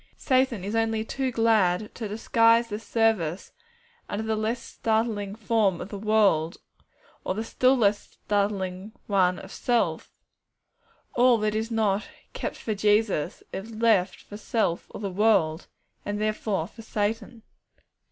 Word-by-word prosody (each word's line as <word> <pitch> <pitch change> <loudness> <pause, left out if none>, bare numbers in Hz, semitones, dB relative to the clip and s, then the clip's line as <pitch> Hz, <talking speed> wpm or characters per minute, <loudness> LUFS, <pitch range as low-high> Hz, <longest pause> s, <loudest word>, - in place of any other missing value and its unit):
And - - -35
Satan 260 -6 +1
is 200 +3 -4
only 225 -1 0
too 265 +2 -2
glad 215 -4 +2
to 225 - -5
disguise 230 +2 +3
this 210 +1 -5
service 215 -8 0 0.6
under 210 +2 -3
the 220 0 -1
less 220 +3 -1
startling 220 -4 -2
form 215 -4 +1
of - - -7
the 200 - -6
world, 200 -6 +2 0.7
or 185 - -2
the 220 - -2
still 255 +3 +2
less 205 -3 +3
startling 200 -1 -2
one 185 -3 +2
of - - -10
self. 240 -1 -1 1.0
All 245 0 +5
that 215 -1 0
is 220 +1 -2
not 215 -3 0 0.3
'kept - - -4
for 220 - -3
Jesus,' 205 -5 +1
is 220 +4 -6
left 215 -5 +2
for 205 - -10
self 215 -6 -1
or - - -9
the 200 -2 -3
world, 185 -5 +2 0.4
and 205 0 -3
therefore 215 -4 -1
for 225 - -13
Satan. 220 +1 -3
215 Hz, 145 wpm, -26 LUFS, 200-225 Hz, 1.0 s, All